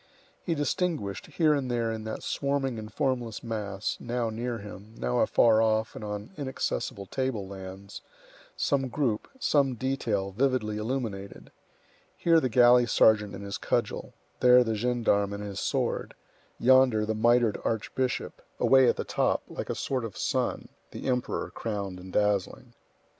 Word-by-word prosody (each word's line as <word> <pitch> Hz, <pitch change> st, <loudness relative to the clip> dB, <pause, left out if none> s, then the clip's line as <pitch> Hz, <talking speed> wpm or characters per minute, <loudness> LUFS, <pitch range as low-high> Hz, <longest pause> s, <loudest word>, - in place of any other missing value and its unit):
He 170 Hz, -, -1 dB
distinguished, 145 Hz, -, -2 dB
here 155 Hz, -3 st, +2 dB
and 140 Hz, -3 st, -1 dB
there 120 Hz, -2 st, 0 dB
in 110 Hz, -1 st, -5 dB
that 110 Hz, -, -5 dB
swarming 140 Hz, -4 st, -1 dB
and 110 Hz, 0 st, -8 dB
formless 120 Hz, -3 st, -2 dB
mass, 105 Hz, -3 st, -3 dB
now 120 Hz, -1 st, -2 dB
near 120 Hz, +2 st, -3 dB
him, 105 Hz, +1 st, -11 dB
now 60 Hz, 0 st, 0 dB
afar 110 Hz, -2 st, +4 dB
off 110 Hz, 0 st, +1 dB
and -, -, -7 dB
on 105 Hz, -, -5 dB
inaccessible 130 Hz, -6 st, -3 dB
table 125 Hz, -3 st, -2 dB
lands, 95 Hz, +1 st, -9 dB, 0.6 s
some 140 Hz, -5 st, +1 dB
group, 120 Hz, -4 st, -1 dB
some 140 Hz, -, +2 dB
detail, 115 Hz, -6 st, -1 dB
vividly 115 Hz, -2 st, 0 dB
illuminated; 105 Hz, -4 st, -4 dB, 0.7 s
here 165 Hz, -1 st, +4 dB
the 130 Hz, -, 0 dB
galley 120 Hz, +1 st, +6 dB
sergeant 105 Hz, -3 st, +4 dB
and 100 Hz, -, -8 dB
his 100 Hz, -, -5 dB
cudgel; -, -, -2 dB, 0.2 s
there 125 Hz, 0 st, +7 dB
the 115 Hz, -2 st, -1 dB
gendarme 110 Hz, -3 st, +1 dB
and 100 Hz, 0 st, -5 dB
his 100 Hz, -2 st, -5 dB
sword; -, -, -1 dB, 0.4 s
yonder 130 Hz, -4 st, +5 dB
the 110 Hz, -, -1 dB
mitred 115 Hz, 0 st, +3 dB
archbishop; 125 Hz, +3 st, -2 dB, 0.2 s
away 130 Hz, -2 st, +6 dB
at -, -, +2 dB
the -, -, -3 dB
top, -, -, 0 dB
like -, -, -6 dB
a -, -, -1 dB
sort 130 Hz, -3 st, -2 dB
of 115 Hz, -4 st, -6 dB
sun, -, -, -1 dB, 0.2 s
the -, -, -8 dB
Emperor, 125 Hz, -2 st, -1 dB
crowned 100 Hz, -4 st, -4 dB
and 95 Hz, +1 st, -10 dB
dazzling. 105 Hz, -1 st, 0 dB
115 Hz, 155 wpm, -28 LUFS, 105-130 Hz, 0.7 s, there